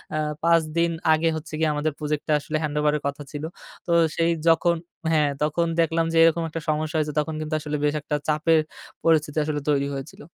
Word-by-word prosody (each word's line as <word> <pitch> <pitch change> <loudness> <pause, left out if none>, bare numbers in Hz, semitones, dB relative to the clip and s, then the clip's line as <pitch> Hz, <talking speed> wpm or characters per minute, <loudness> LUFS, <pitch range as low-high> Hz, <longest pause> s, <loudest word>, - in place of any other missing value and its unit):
আ - - 0 0.3
৫ 170 0 +5 0.2
দিন 170 0 +3 0.2
আগে 160 +1 +1
হচ্ছে 155 - -9
গিয়ে, 160 - +2
আমাদের 150 0 -1
প্রজেক্টটা 150 0 -1
আসলে 155 +2 -3
হ্যান্ডওভারের 150 0 0
কথা 140 +1 -4
ছিল। 145 0 -6 0.4
তো - - -1 0.3
সেই 165 0 +3 0.2
যখন 170 +1 +4 0.4
হ্যাঁ, 150 -3 +3
তখন 170 +3 +1
দেখলাম 165 0 +1
যে, - - +2
এরকম 165 0 +3
একটা 165 +1 -5
সমস্যা 155 +1 -1
হয়েছে, 150 -1 -1
তখন 155 +1 -2
কিন্তু 155 0 -4
আসলে 150 0 -3
বেশ 145 0 +2
একটা 150 0 -2
চাপের 155 +1 +3 0.4
পরিস্থিতি 160 -2 +2
আসলে 150 -1 -2
তৈরি 140 -1 +2
হয়েছিল। 135 +2 -8
155 Hz, 190 wpm, -24 LUFS, 150-165 Hz, 0.4 s, ৫